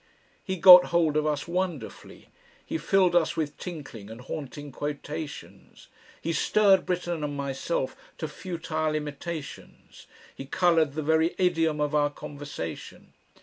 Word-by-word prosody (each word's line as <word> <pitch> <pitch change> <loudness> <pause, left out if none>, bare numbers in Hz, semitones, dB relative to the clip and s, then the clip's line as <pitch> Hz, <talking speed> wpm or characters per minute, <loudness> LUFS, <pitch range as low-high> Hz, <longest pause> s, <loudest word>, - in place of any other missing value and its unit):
He 190 - -3
got 180 0 +10
hold 165 -3 +1
of 155 0 +1
us 150 0 -2
wonderfully, 175 -8 -5 0.4
he - - -3
filled 180 +2 +3
us 165 -1 +2
with 155 -3 -2
tinkling 140 - -8
and 110 +1 -9
haunting 145 +1 -7
quotations, 150 +2 -7 0.3
he 165 - -2
stirred 195 +1 +3
Britten 175 -3 -2
and 145 -1 -3
myself 140 - -2 0.2
to - - -4
futile 160 -4 -3
imitations, 150 +1 -7 0.3
he 135 - -8
coloured 165 -3 +2
the 155 +1 -3
very 160 +2 +2
idiom 165 -4 +1
of 150 0 0
our 145 -1 +3
conversation. 145 - -8
155 Hz, 135 wpm, -27 LUFS, 145-175 Hz, 0.4 s, got